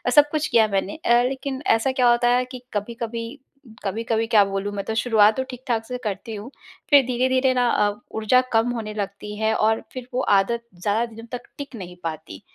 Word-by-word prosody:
सब 295 Hz, 0 st, +7 dB
कुछ 310 Hz, 0 st, 0 dB
किया 225 Hz, -2 st, +4 dB
मैंने 195 Hz, -1 st, -1 dB
अ, 240 Hz, 0 st, +5 dB
लेकिन 265 Hz, 0 st, -4 dB
ऐसा 225 Hz, +4 st, +3 dB
क्या 255 Hz, -2 st, +3 dB
होता 240 Hz, 0 st, +3 dB
है 250 Hz, 0 st, +1 dB
कि 255 Hz, 0 st, -9 dB
कभी-कभी, 230 Hz, +4 st, -4 dB, 0.4 s
कभी-कभी 225 Hz, +3 st, -1 dB
क्या 220 Hz, -3 st, +6 dB
बोलूँ 195 Hz, +1 st, -3 dB
मैं 200 Hz, -, -3 dB
तो 220 Hz, -, -2 dB
शुरुआत 220 Hz, -2 st, +4 dB
तो 260 Hz, -, 0 dB
ठीक-ठाक 245 Hz, -3 st, -3 dB
से 250 Hz, +2 st, -4 dB
करती 215 Hz, +1 st, -4 dB
हूँ 210 Hz, +4 st, -8 dB, 0.4 s
फिर 285 Hz, -2 st, +7 dB
धीरे-धीरे 255 Hz, +1 st, +2 dB
ना 250 Hz, -1 st, +2 dB
अ, 205 Hz, -3 st, +2 dB, 0.2 s
ऊर्जा 220 Hz, +4 st, +4 dB
कम 225 Hz, +2 st, +3 dB
होने 220 Hz, -3 st, -5 dB
लगती 205 Hz, 0 st, -5 dB
है 220 Hz, 0 st, +2 dB
और 220 Hz, +1 st, +2 dB
फिर 255 Hz, -1 st, -7 dB
वो 255 Hz, -, +1 dB, 0.2 s
आदत 235 Hz, +4 st, -1 dB, 0.2 s
ज़्यादा 210 Hz, +4 st, +1 dB
दिन 225 Hz, +1 st, -10 dB
तक 245 Hz, -, -4 dB, 0.2 s
टिक 285 Hz, -3 st, -7 dB
नहीं 180 Hz, -4 st, -8 dB
पाती 155 Hz, -, -6 dB
230 Hz, 200 wpm, -23 LUFS, 210-250 Hz, 0.4 s, सब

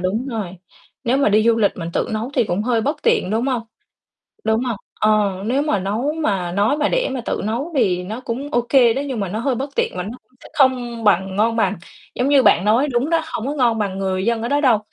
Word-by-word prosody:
đúng 210 Hz, +8 st, -1 dB
rồi. 200 Hz, -6 st, -4 dB, 0.5 s
Nếu 245 Hz, +2 st, +2 dB
mà 275 Hz, -5 st, +3 dB
đi 215 Hz, +1 st, +4 dB
du 230 Hz, 0 st, +4 dB
lịch 205 Hz, -3 st, +2 dB
mình 170 Hz, -2 st, -5 dB
tự -, -, -1 dB
nấu 220 Hz, +4 st, -3 dB
thì 245 Hz, -, +3 dB
cũng 205 Hz, 0 st, -1 dB
hơi 235 Hz, -1 st, +1 dB
bất 285 Hz, +8 st, -1 dB
tiện, 470 Hz, -, +2 dB
đúng 225 Hz, +5 st, 0 dB
hông? 250 Hz, -4 st, -1 dB, 0.8 s
Đúng 220 Hz, +3 st, +1 dB
hông? 240 Hz, -4 st, -2 dB, 0.2 s
Ờ, 210 Hz, -3 st, +2 dB
nếu 265 Hz, +5 st, +1 dB
mà 295 Hz, -10 st, 0 dB
nấu 220 Hz, +10 st, -1 dB
mà 195 Hz, -, -1 dB
nói 205 Hz, +9 st, +2 dB
mà 300 Hz, 0 st, +1 dB
để -, -, 0 dB
mà 260 Hz, -, -3 dB
tự -, -, -1 dB
nấu 240 Hz, +10 st, -3 dB
thì 180 Hz, -8 st, +2 dB
nó 220 Hz, +6 st, -6 dB
cũng 255 Hz, +4 st, -5 dB
ô 240 Hz, 0 st, +1 dB
kê 245 Hz, -5 st, +5 dB
đó, 275 Hz, -, -1 dB
nhưng 255 Hz, -5 st, -3 dB
mà 195 Hz, -, -2 dB
nó 210 Hz, -, -3 dB
hơi 255 Hz, +3 st, 0 dB
bất 275 Hz, +4 st, -4 dB
tiện -, -, +1 dB
và 180 Hz, -, -2 dB
nó 220 Hz, +7 st, -7 dB
cũng -, -, -40 dB
sẽ -, -, -12 dB
không 245 Hz, -4 st, +1 dB
bằng 190 Hz, -1 st, +2 dB
ngon 225 Hz, +2 st, +2 dB
bằng. 220 Hz, -2 st, +1 dB, 0.4 s
Giống 250 Hz, -, 0 dB
như 280 Hz, -2 st, +5 dB
bạn 180 Hz, -6 st, +4 dB
nói 230 Hz, +8 st, +3 dB
đúng 260 Hz, +3 st, 0 dB
đó, 330 Hz, -1 st, +3 dB
hông 230 Hz, -, -3 dB
có 285 Hz, -, -2 dB
ngon 240 Hz, -5 st, +2 dB
bằng 195 Hz, -3 st, -2 dB
người 190 Hz, -1 st, -1 dB
dân 230 Hz, -1 st, 0 dB
ở 235 Hz, -, -2 dB
đó 285 Hz, +2 st, +1 dB
đâu. 250 Hz, -7 st, +4 dB
230 Hz, 260 wpm, -20 LUFS, 205-260 Hz, 0.8 s, kê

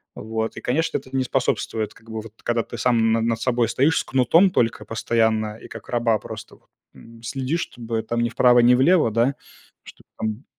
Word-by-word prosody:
Вот 110 Hz, +1 st, -4 dB
и, -, -, -6 dB
конечно, 155 Hz, +7 st, 0 dB
это 135 Hz, -1 st, -10 dB
не 130 Hz, -, +2 dB
способствует, 120 Hz, -4 st, -1 dB
как 115 Hz, 0 st, -19 dB
бы 110 Hz, 0 st, -5 dB
вот 110 Hz, -1 st, -12 dB
когда 120 Hz, -1 st, 0 dB
ты 120 Hz, -, -9 dB
сам 115 Hz, -2 st, +2 dB
на 115 Hz, -, +1 dB
над 115 Hz, 0 st, 0 dB
собой 120 Hz, -1 st, +1 dB
стоишь 145 Hz, +6 st, +2 dB
с -, -, -2 dB
кнутом 160 Hz, +9 st, +4 dB
только 115 Hz, -, 0 dB
постоянно, 110 Hz, -1 st, 0 dB
и -, -, -12 dB
как -, -, -11 dB
раба 120 Hz, -2 st, +1 dB
просто -, -, -9 dB
вот, -, -, -29 dB, 0.3 s
м, 115 Hz, 0 st, -15 dB
следишь, 135 Hz, +7 st, -2 dB
чтобы 115 Hz, -5 st, -4 dB
там 120 Hz, +1 st, -2 dB
ни 120 Hz, -, 0 dB
вправо, 125 Hz, +1 st, +4 dB
ни 120 Hz, +1 st, +6 dB
влево, 145 Hz, -1 st, +4 dB
да. 120 Hz, +5 st, +1 dB, 0.5 s
Чтоб -, -, -15 dB
там 110 Hz, +3 st, -4 dB
120 Hz, 205 wpm, -22 LUFS, 115-130 Hz, 0.5 s, ни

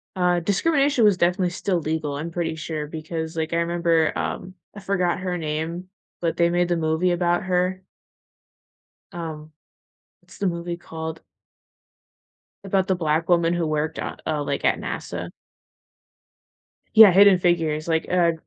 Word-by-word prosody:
uh, 180 Hz, -1 st, +2 dB
discrimination 275 Hz, -, +2 dB
was 205 Hz, -3 st, +4 dB
definitely 180 Hz, +1 st, +1 dB
still 180 Hz, 0 st, -1 dB
legal, 155 Hz, -2 st, -2 dB
I'm 165 Hz, +3 st, -5 dB
pretty 165 Hz, -1 st, -2 dB
sure, 155 Hz, -1 st, -5 dB
because 160 Hz, +1 st, -5 dB
like 160 Hz, +1 st, -2 dB
I -, -, +1 dB
remember, 170 Hz, -1 st, +1 dB
um, 185 Hz, -, -4 dB, 0.2 s
I -, -, -7 dB
forgot 180 Hz, -3 st, 0 dB
her 180 Hz, -1 st, -3 dB
name, 165 Hz, +3 st, -4 dB, 0.3 s
but 165 Hz, -1 st, -1 dB
they 170 Hz, 0 st, +3 dB
made 175 Hz, 0 st, +1 dB
the 175 Hz, -, +1 dB
movie 160 Hz, +3 st, +1 dB
about 175 Hz, 0 st, +1 dB
her. 185 Hz, 0 st, 0 dB, 1.3 s
Um, 155 Hz, -2 st, -7 dB, 0.7 s
what's -, -, -17 dB
the 200 Hz, -, 0 dB
movie 170 Hz, 0 st, -3 dB
called 160 Hz, -1 st, -7 dB, 1.4 s
about 195 Hz, -1 st, 0 dB
the 190 Hz, -, +1 dB
black 165 Hz, -1 st, 0 dB
woman 170 Hz, -1 st, +3 dB
who 175 Hz, -2 st, -1 dB
worked, 155 Hz, +1 st, -2 dB
uh, -, -, -4 dB
uh, 150 Hz, -, 0 dB
like, -, -, -3 dB
at -, -, +3 dB
NASA? -, -, -5 dB, 1.6 s
Yeah, 220 Hz, -4 st, +9 dB
Hidden 195 Hz, 0 st, +7 dB
Figures, 165 Hz, -3 st, 0 dB
like, 160 Hz, -1 st, +1 dB
uh, 175 Hz, -2 st, +3 dB
170 Hz, 150 wpm, -23 LUFS, 160-180 Hz, 1.6 s, Yeah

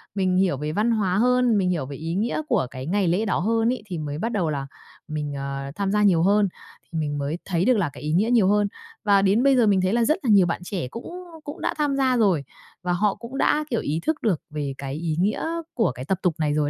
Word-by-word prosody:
mình 185 Hz, -2 st, +1 dB
hiểu 185 Hz, -7 st, +2 dB
về 150 Hz, +2 st, -3 dB
văn 210 Hz, +8 st, +1 dB
hóa 195 Hz, -5 st, +1 dB
hơn, 250 Hz, 0 st, +3 dB
mình 185 Hz, -2 st, +1 dB
hiểu 160 Hz, -7 st, -1 dB
về 140 Hz, -, -7 dB
ý 165 Hz, +3 st, -4 dB
nghĩa 225 Hz, +9 st, 0 dB
của 130 Hz, -, +1 dB
cái 130 Hz, +1 st, -7 dB
ngày 195 Hz, +2 st, +1 dB
lễ 180 Hz, +6 st, +1 dB
đó 200 Hz, -, 0 dB
hơn 225 Hz, +5 st, +1 dB
ấy, 250 Hz, -, -7 dB
thì 180 Hz, -4 st, -5 dB
mới 145 Hz, -1 st, -4 dB
bắt 225 Hz, +8 st, -2 dB
đầu 185 Hz, -8 st, 0 dB
là 140 Hz, -2 st, -3 dB, 0.4 s
mình, 150 Hz, -2 st, -4 dB
ờ, 140 Hz, 0 st, -4 dB
tham 200 Hz, -1 st, -1 dB
gia 210 Hz, 0 st, +2 dB
nhiều 175 Hz, -5 st, +4 dB
hơn, 205 Hz, +1 st, +4 dB, 0.4 s
thì 165 Hz, -, -5 dB
mình 145 Hz, -1 st, -2 dB
mới 145 Hz, +4 st, -2 dB
thấy 180 Hz, -1 st, 0 dB
được 255 Hz, -1 st, +4 dB
là 180 Hz, -7 st, +1 dB
cái 130 Hz, -, -11 dB
ý 150 Hz, -, -2 dB
nghĩa 205 Hz, +7 st, +2 dB
nhiều 225 Hz, -6 st, +4 dB
hơn. 205 Hz, 0 st, +3 dB, 0.4 s
Và 200 Hz, -2 st, +4 dB
đến 200 Hz, +5 st, +3 dB
bây 275 Hz, -1 st, +5 dB
giờ 240 Hz, -3 st, +4 dB
mình 195 Hz, -2 st, +3 dB
thấy 185 Hz, +2 st, +1 dB
là 235 Hz, 0 st, +3 dB
rất 310 Hz, -, +2 dB
là 245 Hz, -, 0 dB
nhiều 200 Hz, -4 st, +6 dB
bạn 175 Hz, +1 st, -2 dB
trẻ 180 Hz, -8 st, -4 dB
cũng 230 Hz, -, -8 dB, 0.4 s
cũng 290 Hz, -, -8 dB
đã -, -, 0 dB
tham 295 Hz, -2 st, +1 dB
gia 260 Hz, -2 st, +2 dB
rồi, 190 Hz, -10 st, +3 dB, 0.4 s
và 180 Hz, 0 st, 0 dB
họ 200 Hz, +3 st, +1 dB
cũng 245 Hz, +3 st, -8 dB
đã, 300 Hz, +1 st, +2 dB
kiểu, 235 Hz, -, 0 dB
ý 155 Hz, +3 st, -1 dB
thức 315 Hz, -1 st, 0 dB
được 190 Hz, -9 st, +1 dB
về 145 Hz, -2 st, -3 dB
cái 135 Hz, -1 st, -5 dB
ý 160 Hz, 0 st, -2 dB
nghĩa 205 Hz, -, 0 dB, 0.3 s
của 225 Hz, -8 st, +1 dB
cái 125 Hz, +1 st, -8 dB
tập 190 Hz, +5 st, 0 dB
tục 180 Hz, -3 st, +2 dB
này 150 Hz, -2 st, +1 dB
rồi 150 Hz, -1 st, +1 dB
190 Hz, 275 wpm, -24 LUFS, 155-220 Hz, 0.4 s, nhiều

